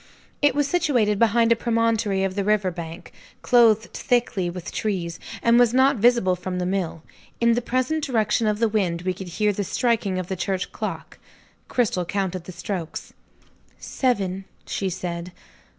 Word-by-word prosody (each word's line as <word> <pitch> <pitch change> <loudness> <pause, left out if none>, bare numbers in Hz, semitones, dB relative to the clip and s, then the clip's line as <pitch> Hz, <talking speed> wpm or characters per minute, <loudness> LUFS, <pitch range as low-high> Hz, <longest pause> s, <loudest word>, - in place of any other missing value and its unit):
It 290 -3 +3
was 290 -1 +2
situated 245 - +1
behind 230 0 +3
a - - +6
promontory 230 -4 +1
of 190 -1 -1
the 200 +1 -1
river 205 -2 +1
bank, 170 0 -8 0.3
clothed 230 -3 +4
thickly 235 -7 0
with 175 -1 -7
trees, 180 -6 -3 0.2
and 235 +1 +5
was 245 0 +4
not 265 +1 +4
visible 230 -4 +3
from 180 0 -5
the 180 - -1
mill. 180 -4 -2 0.4
In 235 0 +4
the 240 - 0
present 255 +6 -1
direction 230 -4 +1
of 210 -1 +1
the 230 +1 +2
wind, 185 -6 -1
we 185 0 0
could 190 0 -8
hear 210 +4 0
the 205 - -2
striking 215 -2 0
of 185 - -2
the 190 - -3
church 185 +1 -2
clock. - - -6 0.5
Cristel 215 -7 0
counted 185 -2 -2
the 185 - -8
strokes. 175 -2 -5 0.6
"Seven," 195 -7 -1 0.2
she 195 - -2
said. 175 -1 -5
205 Hz, 165 wpm, -23 LUFS, 185-235 Hz, 0.6 s, a